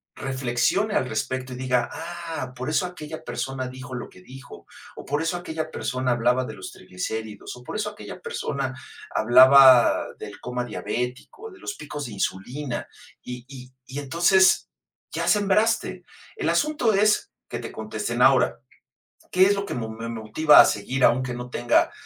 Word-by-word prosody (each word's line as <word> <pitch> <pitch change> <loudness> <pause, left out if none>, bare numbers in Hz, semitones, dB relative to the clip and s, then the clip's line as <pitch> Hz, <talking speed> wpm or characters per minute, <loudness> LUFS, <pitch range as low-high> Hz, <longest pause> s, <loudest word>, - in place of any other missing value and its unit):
reflexione 130 - 0
al 130 - +1
respecto, 130 +3 -3
y - - -6
diga: 125 -1 0
"Ah, 165 -5 -6
por 130 +3 -4
eso 160 +4 +1
aquella 160 -3 -8
persona 135 -1 -4
dijo 130 +1 -8
lo 125 - -5
que 90 - -17
dijo, 130 +6 -13 0.3
o - - -10
por 145 +2 -1
eso 165 +2 -1
aquella 160 -2 -5
persona 130 -1 -2
hablaba 125 +2 +2
de - - -7
los 95 - -8
triglicéridos, 105 +3 -6
o 125 - -14
por - - -7
eso 210 0 -2
aquella 210 0 -10
persona 140 - -3 0.4
hablaba 130 +2 +7
del - - -9
coma 125 0 -3
diabético, 125 - -5
de 380 - -15
los 205 - -5
picos 145 -1 -6
de 120 - -7
insulina". 120 +7 -3 0.4
Y 125 0 -8
y 130 -2 -12
y 135 +2 -5
entonces, 175 +6 +3 0.4
ya - - -2
sembraste. 210 +3 +2 0.3
El 415 - -1
asunto 295 -7 +1
es 210 - +2 0.2
que - - -4
te - - -7
contesten - - -4
ahora, - - +4 0.7
¿qué 185 - +5
es 200 - +3
lo 200 0 -3
que - - -5
me 115 -2 -3
me 115 +1 -6
motiva 115 +7 +4
a - - +6
seguir 125 +6 -1
aunque 130 +1 +2
no 125 0 -6
tenga 120 0 +2
130 Hz, 170 wpm, -24 LUFS, 125-170 Hz, 0.7 s, hablaba